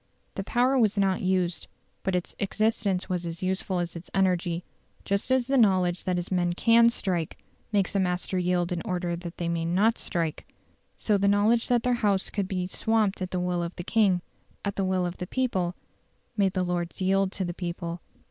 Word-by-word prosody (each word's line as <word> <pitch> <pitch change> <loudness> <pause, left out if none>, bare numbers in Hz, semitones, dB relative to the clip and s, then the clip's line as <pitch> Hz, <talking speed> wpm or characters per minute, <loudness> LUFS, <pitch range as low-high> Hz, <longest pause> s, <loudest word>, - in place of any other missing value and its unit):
The 195 - -4
power 250 +5 +2
was 215 -3 +2
not 195 -2 +2
used, 185 -2 0 0.3
but 190 -1 -1
its 180 - -2
existence 205 -2 0
was 180 -2 -2
as 170 +1 -5
useful 185 0 -1
as 175 -1 -2
its 170 +1 -8
energy. 180 -2 +1 0.4
Just 200 +4 -1
as 260 -1 +3
the 270 +1 +2
knowledge 185 -5 +3
that 185 - +1
his 175 +1 -3
men 175 -1 +1
CAN 230 +5 +5
strike 180 -8 -2 0.3
makes 200 -2 +1
a 200 - +2
master 180 0 0
yield 180 0 0
in 175 -1 -1
order 175 -1 -2
that 170 0 -8
they 170 - -2
may 170 -1 -1
not 195 +7 +2
strike, 165 -4 -3 0.5
so 210 -2 +1
the 200 - +2
knowledge 210 +4 +3
that 240 -2 +2
their 250 - +2
House 200 -3 +1
could 200 -2 -1
be 185 -2 -2
swamped 210 +1 0
at 185 - -2
the 185 - -2
will 180 -1 0
of 170 +1 -4
the 175 - -6
king 195 -4 +2 0.4
at 200 - -2
the 195 - 0
will 185 -1 +1
of 175 0 -5
the 180 - -4
people 190 -9 -1 0.6
made 195 -3 +2
the 185 - 0
Lords 175 -1 -3
yield 195 0 +2
to 190 - -2
the 175 - -3
people. 170 -1 -5
185 Hz, 205 wpm, -27 LUFS, 175-200 Hz, 0.6 s, CAN